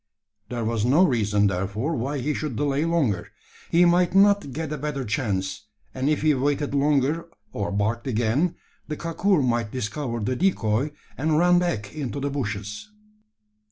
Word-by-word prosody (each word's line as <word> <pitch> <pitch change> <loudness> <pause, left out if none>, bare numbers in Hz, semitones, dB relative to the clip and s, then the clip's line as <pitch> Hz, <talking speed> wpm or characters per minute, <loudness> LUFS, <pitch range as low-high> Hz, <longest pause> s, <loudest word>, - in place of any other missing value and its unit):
There 120 -2 -3
was 115 -1 0
no 140 +10 +5
reason, 105 - +2
therefore, 100 - -1
why 135 +4 -2
he 145 +3 -1
should 150 -4 -3
delay 145 +3 0
longer. 140 - 0 0.4
He 175 +1 +5
might 175 +1 +3
not 200 -6 +4
get 155 +2 -4
a - - -3
better 140 -2 -3
chance; 95 -3 -2 0.3
and 130 +2 -1
if 155 -1 0
he 155 -1 +4
waited 145 +2 0
longer, 145 +3 +1 0.2
or 100 - -2
barked 110 +5 -1
again, 125 +8 +1 0.3
the 150 0 -4
kakur 170 0 +1
might 120 -3 0
discover 125 0 -3
the 125 +4 -1
decoy, 140 - +1 0.3
and 155 +2 +2
run 175 +1 +5
back 110 - -2
into 140 -2 -4
the 140 +1 -2
bushes. 105 - -4
135 Hz, 160 wpm, -24 LUFS, 110-155 Hz, 0.4 s, no